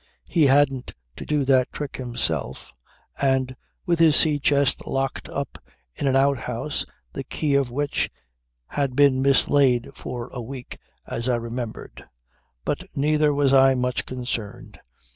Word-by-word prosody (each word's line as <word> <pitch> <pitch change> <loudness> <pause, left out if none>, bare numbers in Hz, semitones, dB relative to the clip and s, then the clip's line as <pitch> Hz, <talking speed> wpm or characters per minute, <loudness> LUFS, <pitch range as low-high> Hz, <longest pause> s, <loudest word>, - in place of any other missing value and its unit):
He 160 -5 +3
hadn't 135 -2 +2 0.2
to - - -9
do 150 -2 +1
that 130 -2 +3
trick 145 -2 -6
himself, 80 - -2 0.5
and 130 -1 +1 0.3
with 170 -2 +1
his 160 -3 +6
sea 150 -2 +4
chest 140 -1 +2
locked 135 0 -2
up 140 0 -5 0.3
in 140 - -2
an 135 - +2
outhouse 135 0 0 0.3
the - - -5
key 150 -3 -2
of 140 -2 +2
which 145 +4 -1 0.6
had 140 -3 -1
been 140 -2 +4
mislaid 135 -2 +3
for 120 0 -7
a 125 - -5
week 125 +2 -8 0.3
as 115 +2 -2
I 125 - +3
remembered. 115 0 -6 0.6
But - - -2
neither 150 +1 +2
was 140 -1 +2
I 135 0 +6
much 125 0 -2
concerned. 120 -3 -5
135 Hz, 145 wpm, -24 LUFS, 125-140 Hz, 0.6 s, his